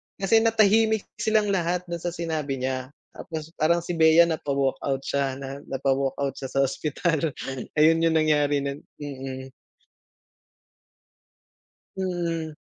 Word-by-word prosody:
kasi 200 +3 +3
natahimik 220 -1 +3 0.2
silang 215 -2 +2
lahat 180 -1 0
dun 170 - -2
sa 175 0 -3
sinabi 155 -5 -2
niya, 130 0 -2 0.2
tapos 160 -1 -7
parang 170 +2 +2
si 175 - -4
Bea 160 +1 +6
napa-walkout 140 -4 -1
siya, 140 -2 -1
na 135 +1 -7
napa-walkout 135 0 -1
siya 135 - -5
sa 135 - +4
ospital. 155 +2 -1 0.4
Ayun 165 +2 +4
yung 165 -1 +2
nangyari 145 -2 +2
nun. 140 +1 -4 0.2
Mm. 135 -2 -7 2.5
Mm. 170 -4 -2
155 Hz, 120 wpm, -25 LUFS, 140-170 Hz, 2.5 s, Bea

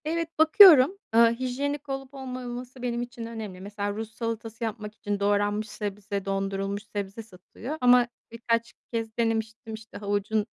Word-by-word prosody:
Evet, 330 +1 -1
bakıyorum. 320 -1 +8 0.2
Eee, 230 0 +6
hijyenik 280 +3 -2
olup 270 0 -5
olmaması 255 -1 -7
benim 240 -1 -1
için 240 -1 -6
önemli. 220 -5 -7
Mesela 205 +1 -3
Rus 220 +1 -5
salatası 230 0 -4
yapmak 215 -1 -4
için 205 -2 -3
doğranmış 205 +1 +1
sebze, 200 -2 -4
dondurulmuş 195 +1 -2
sebze 200 +2 -4
satılıyor 220 - -8
ama 250 0 +6 0.2
birkaç 230 0 -1 0.2
kez 225 -1 -3
denemiştim, 225 0 -1
işte, 220 0 -9
havucun 205 +1 0
225 Hz, 140 wpm, -27 LUFS, 205-250 Hz, 0.2 s, bakıyorum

